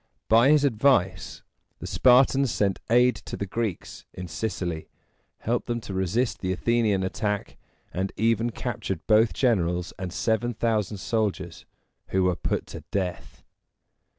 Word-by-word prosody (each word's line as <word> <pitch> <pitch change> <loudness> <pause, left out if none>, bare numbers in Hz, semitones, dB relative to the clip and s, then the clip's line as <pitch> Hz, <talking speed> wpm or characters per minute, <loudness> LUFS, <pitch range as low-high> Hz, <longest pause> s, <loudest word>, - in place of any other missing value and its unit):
By 115 +4 +5
his 150 -1 +5
advice, 120 -7 +1 0.3
the - - -8
Spartans 130 +1 +4
sent 100 -2 0
aid 125 +2 +4
to - - -8
the 100 - -3
Greeks 105 -1 -4
in 90 0 -6
Sicily, 85 -3 -4 0.5
helped 120 +2 -1
them 120 0 -1
to 100 - -7
resist 95 +7 0
the 95 - -2
Athenian 110 -1 +1
attack, 105 +2 -2 0.4
and 95 +1 -2
even 115 +2 +2
captured 105 -8 -4
both 110 +1 +4
generals 90 -8 0
and 95 -1 -4
seven 110 +5 -1
thousand 110 -3 0
soldiers, 110 0 -2 0.4
who 95 0 +1
were 90 -1 +2
put - - -2
to - - -7
death. 90 -3 -4
110 Hz, 140 wpm, -26 LUFS, 95-120 Hz, 0.5 s, By